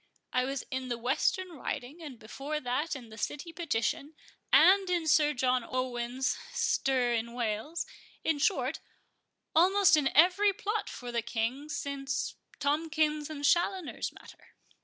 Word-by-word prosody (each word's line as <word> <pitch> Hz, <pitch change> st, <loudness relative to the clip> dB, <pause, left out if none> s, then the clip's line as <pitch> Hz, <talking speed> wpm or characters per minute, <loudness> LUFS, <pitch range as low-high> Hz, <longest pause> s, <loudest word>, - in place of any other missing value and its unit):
I 255 Hz, 0 st, +2 dB
was 275 Hz, +1 st, -3 dB
in 260 Hz, -1 st, -3 dB
the 240 Hz, -1 st, -2 dB
Western 360 Hz, -, 0 dB
Riding; 300 Hz, -1 st, -6 dB
and 290 Hz, -6 st, -8 dB
before 275 Hz, +7 st, -5 dB
that, 285 Hz, +5 st, -1 dB
in 245 Hz, -4 st, -9 dB
the 220 Hz, +1 st, -11 dB
City 315 Hz, +9 st, -4 dB
Petition, 300 Hz, -1 st, -2 dB, 0.4 s
and 385 Hz, 0 st, +6 dB
in 350 Hz, -2 st, +1 dB
Sir 300 Hz, -1 st, +4 dB
John 250 Hz, 0 st, +2 dB
Owen's 255 Hz, +1 st, -2 dB
stir 255 Hz, -3 st, +1 dB
in 235 Hz, 0 st, -2 dB
Wales; 240 Hz, +7 st, -2 dB, 0.4 s
in 315 Hz, -3 st, +1 dB
short, 270 Hz, +2 st, +1 dB, 0.8 s
almost 380 Hz, +3 st, +6 dB
in 295 Hz, -3 st, +2 dB
every 370 Hz, +5 st, +6 dB
plot 420 Hz, 0 st, -2 dB
for 245 Hz, -1 st, -7 dB
the 235 Hz, -1 st, 0 dB
King, 235 Hz, +5 st, -2 dB
since 275 Hz, -2 st, -3 dB, 0.2 s
Tomkins 305 Hz, 0 st, 0 dB
and 290 Hz, -2 st, -4 dB
Challoner's 350 Hz, +2 st, +1 dB
matter." -, -, -16 dB
285 Hz, 140 wpm, -30 LUFS, 250-325 Hz, 0.8 s, and